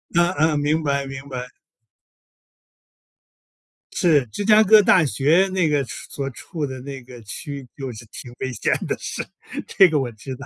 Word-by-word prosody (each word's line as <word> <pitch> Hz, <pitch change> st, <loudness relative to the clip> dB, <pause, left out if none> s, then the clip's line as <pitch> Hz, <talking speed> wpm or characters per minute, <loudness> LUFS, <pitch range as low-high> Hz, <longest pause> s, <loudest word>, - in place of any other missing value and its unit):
嗯 175 Hz, +1 st, +4 dB
嗯， 155 Hz, -2 st, +3 dB
明 155 Hz, +2 st, +1 dB
白 140 Hz, -1 st, 0 dB
明 135 Hz, +1 st, -8 dB
白。 125 Hz, -1 st, -5 dB, 2.5 s
是， 155 Hz, -8 st, +3 dB
芝 195 Hz, -, -5 dB
加 215 Hz, 0 st, +7 dB
哥 215 Hz, +1 st, +7 dB
大 180 Hz, -3 st, +5 dB
学 155 Hz, +8 st, +3 dB
那 180 Hz, -4 st, +2 dB
个 145 Hz, -2 st, +1 dB
处 125 Hz, -, -12 dB, 0.2 s
所 140 Hz, -1 st, -4 dB
处 155 Hz, +4 st, -5 dB
的 130 Hz, -1 st, -6 dB
那 135 Hz, -1 st, -7 dB
个 120 Hz, -1 st, -12 dB
区 140 Hz, +3 st, -7 dB
就 135 Hz, -2 st, -5 dB
是 115 Hz, +1 st, -10 dB
挺 120 Hz, -, -9 dB
危 130 Hz, -, -3 dB
险 -, -, 0 dB
的， -, -, -1 dB
是， -, -, -5 dB, 0.4 s
这 190 Hz, -2 st, +5 dB
个 150 Hz, -2 st, +1 dB
我 125 Hz, -3 st, -2 dB
知 130 Hz, +4 st, -8 dB
道。 140 Hz, +2 st, -10 dB
140 Hz, 190 characters per minute, -22 LUFS, 130-160 Hz, 2.5 s, 加